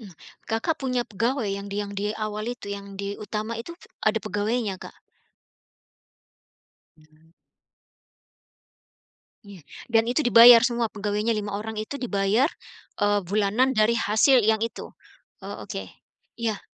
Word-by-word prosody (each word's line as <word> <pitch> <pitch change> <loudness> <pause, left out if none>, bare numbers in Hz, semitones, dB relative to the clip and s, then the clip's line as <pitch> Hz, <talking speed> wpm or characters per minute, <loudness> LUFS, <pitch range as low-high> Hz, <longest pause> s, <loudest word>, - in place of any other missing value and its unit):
Hmm. 215 - -11 0.4
Kakak 225 +9 0
punya 255 -2 0
pegawai 230 +2 -1
yang 200 0 -7
di 200 - -4
yang 200 0 -7
di 205 - -2 0.2
awal 215 0 -4
itu, 235 - -13
yang 200 0 -10
di 200 - -4 0.2
utama 215 +2 -4
itu, 340 - -9 0.3
ada 220 +1 +3
pegawainya, 215 0 -1
Kak? - - -11 2.0
Iya. 155 +1 -25 2.1
Iya. 195 -6 -13 0.2
Dan 225 -1 +3
itu 245 +5 0
dibayar 240 -2 +9
semua 235 -2 0
pegawainya 210 +2 -1
5 210 -2 -3
orang 215 +1 -5
itu 250 +6 -5
dibayar, 220 +2 +1 0.5
eee, 205 0 +2
bulanan 210 +7 +1
dari 220 +1 +3
hasil 225 +3 +4
yang 220 0 +2
itu. 230 - -5 0.5
Oh - - -7
oke. - - -6 0.5
Iya. 225 -3 -2
215 Hz, 135 wpm, -25 LUFS, 205-235 Hz, 2.1 s, dibayar